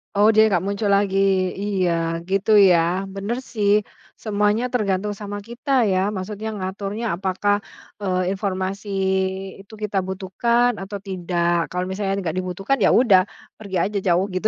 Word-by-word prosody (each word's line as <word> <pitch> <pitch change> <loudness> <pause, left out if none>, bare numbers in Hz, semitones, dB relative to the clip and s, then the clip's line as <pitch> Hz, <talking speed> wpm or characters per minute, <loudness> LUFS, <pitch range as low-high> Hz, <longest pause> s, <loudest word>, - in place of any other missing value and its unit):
Oh, 210 +2 +5
dia 220 0 +5
nggak 190 -3 +1
muncul 200 +2 -2
lagi, 195 -1 +1 0.4
iya, 190 -4 0 0.4
gitu 195 +2 +1 0.2
ya, 170 - +5 0.4
bener 200 +5 -3 0.2
sih. 205 -2 +2 0.5
Semuanya 210 +2 +1
tergantung 205 -3 0
sama 205 0 -5
kita 245 +5 -6 0.2
ya 185 - +2 0.2
maksudnya 210 +3 -5
ngaturnya 200 +3 -4
apakah, 190 +2 0 0.5
eee, 185 -1 0
informasi 195 0 -3 0.7
itu 200 +3 -15
kita 205 -1 -2
butuhkan 235 +6 +1
atau 200 +1 -5
tidak. 175 -2 0
Kalau 180 +1 -3
misalnya 195 0 -2
nggak 165 +1 -3
dibutuhkan 190 +8 -1
ya 205 - +4
udah 200 -7 +6 0.4
pergi 200 -3 -6
aja 205 +1 -2
jauh 180 +2 +3
gitu. 185 +4 0
195 Hz, 145 wpm, -22 LUFS, 185-210 Hz, 0.7 s, udah